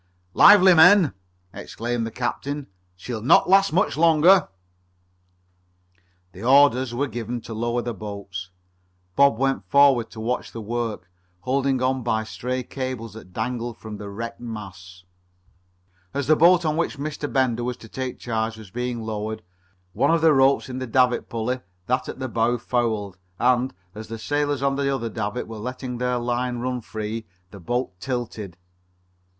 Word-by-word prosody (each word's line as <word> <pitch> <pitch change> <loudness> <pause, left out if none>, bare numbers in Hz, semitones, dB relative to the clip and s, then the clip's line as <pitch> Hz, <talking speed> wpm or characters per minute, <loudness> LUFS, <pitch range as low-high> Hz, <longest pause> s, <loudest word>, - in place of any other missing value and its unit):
"Lively, 190 -2 +8
men!" 175 - +6 0.4
exclaimed 120 0 -4
the - - -4
captain. 135 +5 -3 0.3
"She'll 110 +5 -6
not 120 - +5
last 195 +1 +5
much 185 +6 +1
longer!" 165 +4 +5 1.8
The 95 - -12
orders 130 -1 +5
were 125 +4 -1
given 120 -1 -5
to 115 - -8
lower 120 +2 -1
the 120 0 -3
boats. 100 -3 -7 0.7
Bob 140 -4 +4
went 135 +1 0
forward 140 -5 +5
to 110 - -11
watch 120 +3 -3
the 115 - -6
work, 115 -4 -4 0.3
holding 130 0 0
on 130 0 +1
by 110 -2 0
stray 125 +3 -4
cables 130 -5 -5
that 110 -4 -12
dangled 120 +3 -4
from 110 -1 -8
the 100 0 -8
wrecked 115 +3 -6
masts. 95 -5 -9 1.1
As 140 -1 -1
the 155 +4 +5
boat 170 +2 +5
of 155 0 0
which 170 -3 -1
Mr. 145 0 -4
Bender 125 -3 +1
was 125 0 -3
to 115 - -13
take 130 +2 -5
charge 110 -1 -3
was 110 -4 -12
being 125 0 -3
lowered, 110 0 -4 0.5
one - - +2
of 165 -1 +3
the 160 -1 +5
ropes 135 0 +3
in 130 0 -5
the 130 - -4
davit 125 0 +2
pulley, 120 +3 -2 0.3
that 125 +4 -1
at - - -6
the 130 0 -4
bow, 115 0 +1
fouled, 110 -6 -2 0.2
and, 125 +1 +2 0.2
as 110 +1 -9
the 115 - -6
sailors 145 +2 -1
at 135 0 +1
the 140 -1 0
other 130 -4 -2
davit 110 +3 -3
were 110 -1 -8
letting 125 +1 -5
their 125 0 0
line 120 +1 -2
run 125 +1 -3
free, 110 +1 -5 0.2
the 100 - -11
boat 120 +8 -2
tilted. 110 -6 -5
120 Hz, 165 wpm, -23 LUFS, 110-135 Hz, 1.8 s, Lively